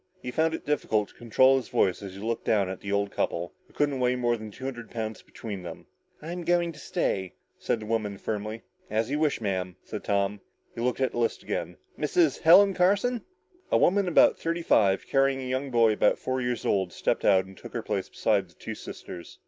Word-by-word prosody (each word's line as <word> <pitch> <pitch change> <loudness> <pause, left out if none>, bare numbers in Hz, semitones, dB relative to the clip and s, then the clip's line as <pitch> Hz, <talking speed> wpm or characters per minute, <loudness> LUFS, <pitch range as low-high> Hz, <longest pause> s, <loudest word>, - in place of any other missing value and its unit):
He 125 - -5
found 160 +3 +1
it - - -9
difficult 110 -8 0
to - - -19
control 130 +3 +4
his 130 - -5
voice 90 +1 +1
as 95 -2 -8
he - - -9
looked 115 +2 -2
down 100 -4 +2
at 95 - -5
the 100 - -6
old 100 0 0
couple, 85 +1 -2
who - - -24
couldn't 145 -2 0
weigh 125 0 +2
more 120 -1 +1
than 110 -1 -8
two 105 - -12
hundred 120 -4 -6
pounds 110 -1 -4
between 105 -5 -7
them. 85 -2 -9 0.4
"I'm 175 +2 -5
going 175 0 +2
to 150 - -13
stay," 95 -8 -2 0.2
said 115 - -1
the - - -7
woman 105 -2 -1
firmly. 110 +2 -4 0.3
"As 110 +4 0
you 145 - 0
wish, 155 -2 +1
Madam," 95 -3 -2
said 105 - -6
Tom. 100 0 0 0.3
He 115 - -6
looked 125 +2 0
at 130 - +2
the - - -4
list 115 - 0
again. 85 +1 -4 0.2
"Mrs. 150 -1 +2
Helen 195 +5 +7
Carson?" 205 +7 +2 0.5
A - - +5
woman 195 +1 +3
about 175 - +5
thirty 170 +1 -2
five, 100 - +3
carrying 135 0 +2
a 130 - -5
young 130 +2 -2
boy 115 -3 +4
about 105 - +3
four 130 0 -2
years 125 -1 -2
old, 95 -3 +1
stepped - - -1
out 95 -2 +4
and 95 0 -13
took - - -11
her 115 - -3
place 100 -3 -2
beside 100 -4 +1
the 85 - -23
two - - -6
sisters. 85 -1 -9
115 Hz, 220 wpm, -27 LUFS, 100-140 Hz, 0.5 s, Helen